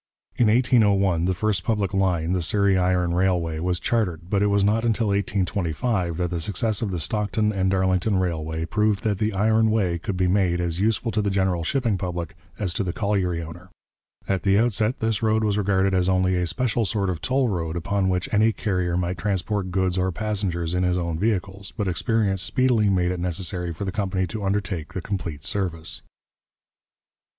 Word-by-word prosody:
In 120 - +3
1801 105 -7 +3
the 95 - +1
first 100 -1 0
public 105 -2 -1
line, 90 -4 +1
the 90 -1 +1
Surrey 100 +3 +2
Iron 90 -1 +1
Railway, 90 -3 0
was 90 +1 0
chartered, 90 -7 -1
but 100 -1 +2
it 105 - +3
was 100 -1 +2
not 110 +3 +2
until 115 -2 +1
1825 95 -2 -1
that 90 -1 -1
the 85 - -2
success 105 +4 -1
of 110 - -1
the 90 -3 -3
Stockton 105 +4 0
and 95 -1 +1
Darlington 95 +1 +1
Railway 80 -3 -2
proved 105 +2 0
that 105 -3 0
the 110 0 +1
iron 110 +2 +2
way 95 -6 +1
could 95 +1 -4
be 90 - +2
made 90 -2 +2
as 85 -1 -2
useful 110 +3 +1
to 110 - 0
the 100 - 0
general 95 -3 0
shipping 115 0 0
public 90 -2 -4 0.2
as 95 -5 -1
to 95 - -1
the 90 - -2
colliery 90 -4 -1
owner. 85 +3 -10 0.6
At 95 -1 0
the 100 -1 +3
outset 110 +2 +1
this 110 -2 0
road 110 0 +2
was 105 -2 +1
regarded 95 -1 +1
as 90 0 +2
only 95 0 +2
a 90 -1 0
special 120 +5 0
sort 100 -2 0
of 85 - -5
toll 130 0 +1
road 85 -4 -2
upon 100 +2 0
which 90 +6 -1
any 110 +2 +4
carrier 90 -5 -1
might 90 0 -2
transport 100 -1 -1
goods 95 0 0
or 95 0 +1
passengers 95 -4 -2
in 90 - +1
his 90 0 +1
own 85 -2 -2
vehicles, 100 -2 -2
but 105 - -1
experience 95 +1 0
speedily 125 -5 +2
made 90 -2 +1
it 90 - -3
necessary 90 0 -2
for 85 +5 -5
the 95 - -2
company 95 -2 -1
to 105 +3 -6
undertake 95 -5 -2
the 95 - -3
complete 85 -7 -5
service. 85 -5 -3
95 Hz, 195 wpm, -24 LUFS, 90-105 Hz, 0.6 s, any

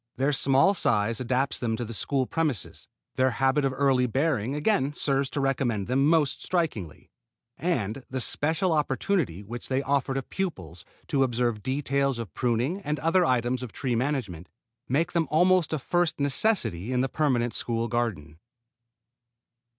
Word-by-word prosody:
Their 135 +3 +1
small 135 +7 +4
size 115 - +1
adapts 130 +2 -1
them 115 -2 -1
to 120 - -3
the 115 - -7
school 130 +4 0
premises, 150 - -2 0.3
their 130 0 +4
habit 135 +4 +1
of 135 - +1
early 135 -3 +3
bearing 135 -1 0
again 150 -3 +1
serves 140 -2 0
to 145 - -3
recommend 130 -7 0
them 135 +5 +2
most 155 -3 +2
strikingly, 140 - -2 0.4
and 130 - -2
the 130 - -3
special 160 +8 0
opportunity 145 - 0
which 120 +4 -6
they 135 +1 0
offer 135 -1 0
to 135 - -1
pupils 90 - -5 0.3
to 140 - +1
observe 120 -4 0
details 140 +1 0
of 110 -9 -6
pruning 125 - 0
and 150 -4 -2
other 165 +4 +2
items 125 -3 +1
of 125 -4 -7
tree 130 -5 -2
management, 115 - -2 0.4
make 150 +6 +1
them 165 -3 0
almost 180 +1 +3
a 155 - 0
first 175 +4 0
necessity 140 - +1
in 125 -1 +1
the 135 - +1
permanent 125 -5 0
school 115 -1 -1
garden. 100 -11 -3
135 Hz, 160 wpm, -26 LUFS, 120-150 Hz, 0.4 s, small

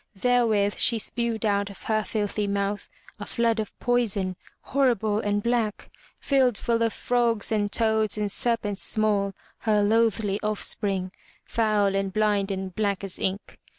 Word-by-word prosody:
Therewith 220 -3 +2
she 235 - +4
spewed 230 0 -1
out 200 -1 +1
of 200 - -12
her 215 -1 0
filthy 210 -1 -2
mouth 200 0 -2 0.3
a - - -5
flood 230 -1 +1
of 215 - -5
poison, 210 -7 0 0.3
horrible 230 -6 +1
and 205 -1 -1
black, 235 -3 -1 0.3
filled 260 -5 +2
full 230 -1 0
of 230 -1 +2
frogs 235 -2 0
and 205 -2 0
toads 220 -1 +2
and 210 -1 -1
serpents 210 -4 -1
small, 205 -3 +1 0.2
her 210 -2 +2
loathly 215 -2 +2
offspring, 200 -3 -2 0.3
foul 210 -3 +1
and 195 0 -1
blind 205 -1 +1
and 190 -1 -4
black 200 -2 -1
as 195 -2 -5
ink. 195 +2 -3
210 Hz, 150 wpm, -25 LUFS, 200-230 Hz, 0.3 s, she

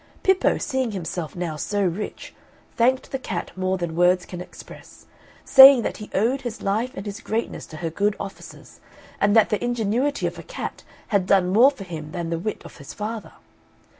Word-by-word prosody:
Pippo, 380 0 +3
seeing 260 -5 -2
himself 170 -3 -5
now 175 -3 -3
so 205 +6 -1
rich, 185 +3 -4 0.4
thanked 255 +3 +1
the 270 - -2
cat 190 -8 -5
more 185 0 -1
than 170 -3 -4
words 180 +1 +3
can 180 -1 -8
express, 180 - -13 0.4
saying 265 -2 +9
that - - -3
he 210 - -9
owed 240 +7 +1
his 240 -2 -6
life 220 +6 0
and 195 - -7
his 205 +1 -6
greatness 225 +2 -3
to 155 - -10
her 165 -1 -4
good 205 +4 0
offices; 195 - -10 0.4
and 205 +1 +3
that 220 -2 +5
the 210 - -1
ingenuity 245 +4 0
of - - -3
a - - -6
cat - - -7 0.3
had 200 -5 +1
done 190 -2 +3
more 240 +6 +7
for 270 -8 -9
him 160 -4 -8
that 170 -2 -4
the 165 - -1
wit 215 +5 -4
of - - -12
his 140 - -11
father. 215 +1 -5
205 Hz, 195 wpm, -23 LUFS, 180-235 Hz, 0.4 s, saying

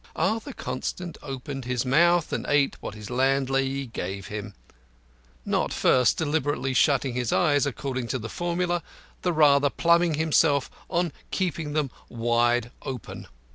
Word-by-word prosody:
Arthur 220 - -1
Constant 165 - -4
opened 135 -1 -6
his 125 0 -1
mouth 170 +5 +3
and - - -1
ate 145 -1 +3
what - - -6
his 105 0 -9
landlady 135 +1 +1
gave 100 -5 -5
him, 105 -1 -6 0.9
not - - 0
first 125 -2 +3
deliberately 145 -4 0
shutting 135 +1 +3
his 125 -2 -1
eyes 145 -4 +3
according 130 -2 -3
to 130 - -1
the 115 -2 -6
formula, 175 +3 -1 0.4
the 180 - +1
rather 145 -3 +5
pluming 170 +1 +3
himself 150 -2 +2 0.2
on 175 -2 0 0.2
keeping 165 -5 -2
them 150 -4 0 0.2
very 120 - -10
wide 120 +1 +2
open. 130 -4 -7
140 Hz, 140 wpm, -26 LUFS, 125-160 Hz, 0.9 s, rather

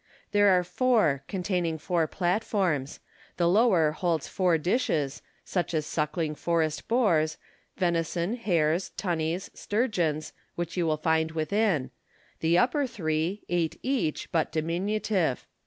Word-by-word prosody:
There 205 -1 +5
are 180 -1 +4
four, 210 - +2
containing 180 -4 -1
four 165 +1 0
platforms. 180 -6 -1 0.4
The 170 - +2
lower 180 -5 +4
holds 165 -1 -1
four 180 -3 +2
dishes, 160 - 0 0.2
such 175 -2 -2
as 155 -1 0
sucking 155 +1 -1
forest 160 -1 -1
boars, 170 -11 +2 0.4
venison, 170 +1 0
hares, 175 -7 +1
tunnies, 175 -1 -2
sturgeons, 180 - -1 0.2
which 170 -1 -4
you 175 -3 +1
will 155 -1 +1
find 160 0 +1
within; 160 -2 0 0.5
the 165 +2 +3
upper 265 +8 +2
three, 170 -3 -2
eight 170 -2 0
each, 255 - -1
but 165 -3 +1
diminutive. 175 - -1
170 Hz, 125 wpm, -27 LUFS, 160-200 Hz, 0.5 s, There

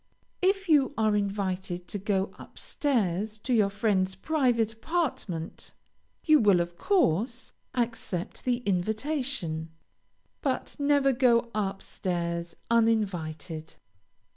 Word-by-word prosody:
If 385 +1 +2
you 290 -3 +4
are 215 -1 +3
invited 190 -3 -2
to 205 - -3
go 195 -1 0
up - - -13
stairs 215 - -1
to 245 +4 -2
your 210 -4 +4
friend's 200 -2 +1
private 240 -4 +1
apartment, 225 - -3 0.5
you 310 -2 +6
will, 200 -5 +5
of 175 0 -2
course, 245 - +1 0.2
accept 230 -7 -2
the 245 -1 0
invitation, 215 - -1 0.7
but - - -2
never 285 -1 +3
go 235 -2 +3
up 195 -2 -2
stairs 170 -2 -3 0.2
uninvited. 180 -8 0
215 Hz, 110 wpm, -28 LUFS, 185-255 Hz, 0.7 s, you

